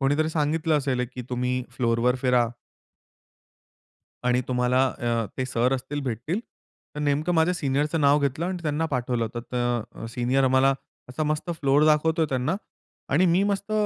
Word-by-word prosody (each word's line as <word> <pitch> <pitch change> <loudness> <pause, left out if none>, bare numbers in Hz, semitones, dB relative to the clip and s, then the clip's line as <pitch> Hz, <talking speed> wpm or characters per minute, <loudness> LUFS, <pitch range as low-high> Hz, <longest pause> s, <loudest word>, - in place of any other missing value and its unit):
कोणीतरी 145 +3 +2
सांगितलं 155 +1 +1
असेल 130 -3 -1
एक 125 - -2
की 125 - -5
तुम्ही 125 0 0 0.2
फ्लोअरवर 120 0 +2
फिरा 125 -2 +3 1.8
आणि 125 0 +3
तुम्हाला 125 +1 +2
अ, 115 -2 0
ते 130 - 0
सर 125 +1 +1
असतील, 135 +3 -4
भेटतील. 130 - -2 0.5
तर 150 - -5
नेमकं 150 +4 +1
माझ्या 165 +3 +3
सीनियरचं 150 0 0
नाव 145 0 +5
घेतलं 140 +3 -1
आणि 185 -1 -3
त्यांना 150 +1 0
पाठवलं 125 -4 -1
होतं. 120 +2 -5
तर 120 -1 0 0.2
अ, - - -4
सीनियर 125 +2 +2
आम्हाला 130 +1 +4 0.4
असा 125 +5 -3
मस्त 155 +3 -1
फ्लोअर 140 +2 +4
दाखवतो 160 +2 +3
आहे 155 - 0
त्यांना. 135 +7 0 0.6
आणि 180 +6 +4
मी 175 +2 +3
मस्त 200 +1 -2
135 Hz, 165 wpm, -25 LUFS, 125-155 Hz, 1.8 s, नाव